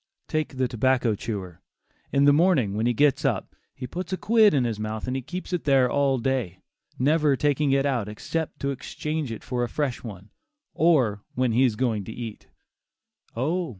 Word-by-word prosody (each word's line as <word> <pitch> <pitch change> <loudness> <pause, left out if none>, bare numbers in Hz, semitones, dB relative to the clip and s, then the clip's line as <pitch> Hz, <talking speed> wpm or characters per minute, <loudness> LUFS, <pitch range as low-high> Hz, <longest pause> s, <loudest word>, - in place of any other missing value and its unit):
Take 155 -3 -2
the 130 -1 +1
tobacco 125 -1 +1
chewer. 95 -5 -6 0.5
In 140 0 +3
the 145 - +6
morning 150 - +3
when 110 +3 0
he - - +3
gets 145 +3 +3
up, 135 -5 -1 0.2
he 130 - -6
puts 180 +9 -6
a 185 - -1
quid 220 0 +5
in 135 -4 +2
his 115 -3 -2
mouth 110 +1 -4
and 130 0 -3
keeps 180 0 -6
it 175 - -1
there 135 -3 +4
all 140 -2 +2
day, 125 -8 -1 0.4
never 150 +1 +3
taking 145 0 +1
it 135 0 +2
out 120 -7 0
except 160 +9 -4
to 140 - 0
exchange 150 +1 -4
it 115 - -7
for 125 -1 -2
a 120 - -2
fresh 140 0 -2
one, 100 -3 -9 0.4
or 130 -11 +3
when 125 -1 +1
he 120 +4 +3
is 115 -4 +1
going 110 -3 0
to - - -7
eat; 115 -2 -8 0.9
oh! 160 +8 -1
130 Hz, 190 wpm, -25 LUFS, 115-150 Hz, 0.9 s, the